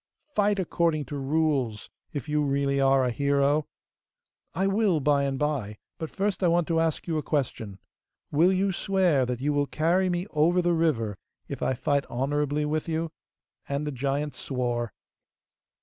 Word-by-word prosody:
Fight 205 Hz, 0 st, +2 dB
according 170 Hz, -4 st, 0 dB
to 145 Hz, -, -6 dB
rules, 140 Hz, -6 st, 0 dB, 0.2 s
if 145 Hz, 0 st, -5 dB
you 150 Hz, 0 st, +1 dB
really 140 Hz, -1 st, +1 dB
are 135 Hz, -1 st, +4 dB
a 125 Hz, -, 0 dB
hero!' 140 Hz, +3 st, +2 dB, 0.9 s
'I 190 Hz, +3 st, +1 dB
will 195 Hz, -4 st, +2 dB
by 140 Hz, 0 st, +2 dB
and 135 Hz, -1 st, -1 dB
by, 130 Hz, -8 st, -2 dB, 0.2 s
but 160 Hz, -, -4 dB
first 200 Hz, 0 st, -1 dB
I -, -, +5 dB
want 170 Hz, -1 st, +2 dB
to 165 Hz, -1 st, +2 dB
ask 165 Hz, -2 st, 0 dB
you 160 Hz, -2 st, 0 dB
a -, -, -2 dB
question! 120 Hz, -10 st, -2 dB, 0.5 s
Will 165 Hz, +5 st, +4 dB
you 190 Hz, +1 st, +1 dB
swear 180 Hz, -8 st, +2 dB
that 125 Hz, 0 st, -3 dB
you 145 Hz, +2 st, +1 dB
will 145 Hz, 0 st, +1 dB
carry 175 Hz, +6 st, +1 dB
me 175 Hz, 0 st, -1 dB
over 165 Hz, +4 st, +3 dB
the 175 Hz, -1 st, +2 dB
river 125 Hz, -, 0 dB, 0.3 s
if -, -, -6 dB
I 130 Hz, -, +1 dB
fight 140 Hz, +2 st, 0 dB
honourably 145 Hz, +3 st, -1 dB
with 155 Hz, +2 st, -2 dB
you?' 160 Hz, 0 st, -1 dB, 0.6 s
And 140 Hz, +1 st, -1 dB
the 150 Hz, -, -2 dB
giant 140 Hz, +2 st, -2 dB
swore. 120 Hz, -3 st, -2 dB
150 Hz, 170 wpm, -27 LUFS, 135-165 Hz, 0.9 s, I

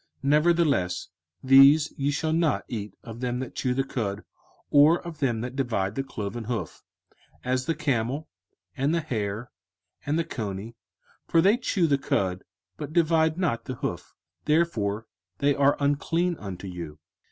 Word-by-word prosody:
05:014:007 140 Hz, -, 0 dB
Nevertheless 150 Hz, -, +2 dB, 0.4 s
these 135 Hz, +3 st, +7 dB
ye 140 Hz, 0 st, 0 dB
shall 155 Hz, +2 st, 0 dB
not 165 Hz, -2 st, +1 dB
eat 105 Hz, -5 st, -5 dB
of 115 Hz, 0 st, -9 dB
them 125 Hz, -1 st, -2 dB
that 130 Hz, 0 st, -5 dB
chew 125 Hz, -1 st, -1 dB
the 135 Hz, -, +1 dB
cud, 105 Hz, -6 st, -3 dB, 0.5 s
or 150 Hz, +4 st, +6 dB
of 165 Hz, -3 st, -7 dB
them 120 Hz, -5 st, 0 dB
that 125 Hz, +2 st, -5 dB
divide 110 Hz, -8 st, -1 dB
the 135 Hz, -, -2 dB
cloven 110 Hz, -3 st, -5 dB
hoof; 120 Hz, 0 st, -4 dB, 0.6 s
as 130 Hz, 0 st, -1 dB
the 165 Hz, -, +1 dB
camel, 135 Hz, +2 st, -1 dB, 0.5 s
and 140 Hz, +4 st, +1 dB
the -, -, +2 dB
hare, 110 Hz, -4 st, -3 dB, 0.5 s
and 145 Hz, +2 st, 0 dB
the 165 Hz, -, +1 dB
coney: 110 Hz, -4 st, -5 dB, 0.5 s
for 165 Hz, -, +3 dB
they 195 Hz, +6 st, +5 dB
chew 210 Hz, -7 st, 0 dB
the 140 Hz, -3 st, +2 dB
cud, 95 Hz, -6 st, -1 dB, 0.3 s
but 150 Hz, 0 st, -6 dB
divide 160 Hz, -1 st, +3 dB
not 140 Hz, -11 st, -1 dB
the 130 Hz, -, -4 dB
hoof; -, -, -5 dB, 0.3 s
therefore 115 Hz, -10 st, +1 dB, 0.3 s
they 140 Hz, 0 st, +2 dB
are 140 Hz, 0 st, +3 dB
unclean 165 Hz, +5 st, +1 dB
unto 100 Hz, -2 st, -7 dB
you. 85 Hz, -4 st, -7 dB
135 Hz, 160 wpm, -26 LUFS, 110-155 Hz, 0.6 s, these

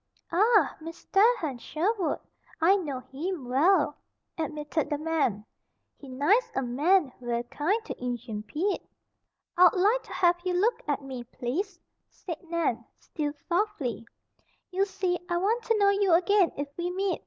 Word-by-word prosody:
"Ah! 425 Hz, +8 st, +4 dB
Mis 330 Hz, +1 st, -9 dB
tair 450 Hz, +5 st, +5 dB
Hen 280 Hz, -, -4 dB
Sherwood! 355 Hz, -, -1 dB, 0.4 s
I 345 Hz, +5 st, +5 dB
know 290 Hz, -10 st, -3 dB
heem 290 Hz, +2 st, -5 dB
well," 310 Hz, +10 st, +3 dB, 0.4 s
admitted 305 Hz, -1 st, -2 dB
the 295 Hz, -, 0 dB
man. 290 Hz, -10 st, 0 dB, 0.5 s
"He 275 Hz, -, -13 dB
nice 295 Hz, -, +2 dB
a 270 Hz, -, 0 dB
man 295 Hz, +5 st, +2 dB
ver' 240 Hz, -1 st, -1 dB
kind 310 Hz, -, 0 dB
to 250 Hz, -, -7 dB
Injun 240 Hz, -3 st, -4 dB
Pete." 335 Hz, -, -2 dB, 0.8 s
"I'd 360 Hz, 0 st, +7 dB
like 420 Hz, +7 st, +3 dB
to -, -, -11 dB
have 350 Hz, -1 st, +3 dB
you 365 Hz, -1 st, -1 dB
look 425 Hz, +7 st, +2 dB
at 285 Hz, -1 st, -1 dB
me, 260 Hz, -3 st, -6 dB
please," 340 Hz, -, -4 dB, 0.3 s
said 340 Hz, -4 st, -8 dB
Nan, 315 Hz, -9 st, 0 dB
still 295 Hz, -2 st, -4 dB
softly. 340 Hz, -, -1 dB, 0.6 s
"You 385 Hz, +2 st, +2 dB
see, 375 Hz, -2 st, -1 dB
I 345 Hz, -, +1 dB
want 430 Hz, +7 st, +1 dB
to 455 Hz, -, +2 dB
know 400 Hz, -1 st, +5 dB
you 400 Hz, -3 st, +2 dB
again 365 Hz, +1 st, +4 dB
if 285 Hz, +1 st, -2 dB
we 350 Hz, 0 st, -1 dB
meet. 375 Hz, 0 st, -1 dB
335 Hz, 155 wpm, -28 LUFS, 275-390 Hz, 0.8 s, I'd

